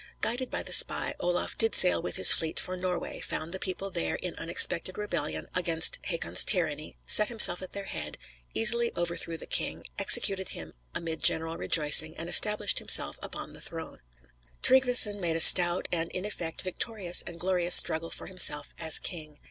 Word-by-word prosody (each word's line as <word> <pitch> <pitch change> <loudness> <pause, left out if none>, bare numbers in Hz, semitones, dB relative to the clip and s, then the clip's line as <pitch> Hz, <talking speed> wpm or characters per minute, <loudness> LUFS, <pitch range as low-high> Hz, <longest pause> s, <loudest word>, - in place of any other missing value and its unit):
Guided 245 +2 -3
by - - -7
the - - -3
spy, - - +4
Olaf 175 0 -5
did 225 - 0
sail 85 -1 +2
with 90 - -8
his 95 - +6
fleet 160 -1 -4
for 185 - -6
Norway, 180 -1 -8
found 160 +2 -7
the 190 - -8
people 190 +1 -6
there 80 - -5
in - - -9
unexpected 185 - 0
rebellion 175 -8 -6
against 165 -2 0
Hakon's 170 -3 +2
tyranny, 155 -6 -2
set 210 - +5
himself 210 -7 +3
at 185 - -12
their 200 - -9
head, 75 - -8 0.4
easily 235 +1 0
overthrew 170 -1 -5
the - - -9
king, - - -7
executed 190 -1 +5
him - - -11 0.2
amid 165 -1 -8
general 160 0 -1
rejoicing 155 0 +1
and 165 +1 -10
established 210 +2 0
himself - - 0
upon - - -10
the - - -13
throne.] - - -11 0.6
Tryggveson 250 -5 +1
made 170 -2 -4
a - - -5
stout, 175 +1 +8
and, 165 -1 -4
in 185 +2 -8
effect, 170 -6 -7
victorious 185 -1 -1
and 170 -1 -9
glorious 180 -1 +3
struggle 165 +1 +3
for - - -9
himself 150 -5 +3
as 160 -2 +3
king. 155 -4 -6
175 Hz, 175 wpm, -24 LUFS, 160-195 Hz, 0.6 s, stout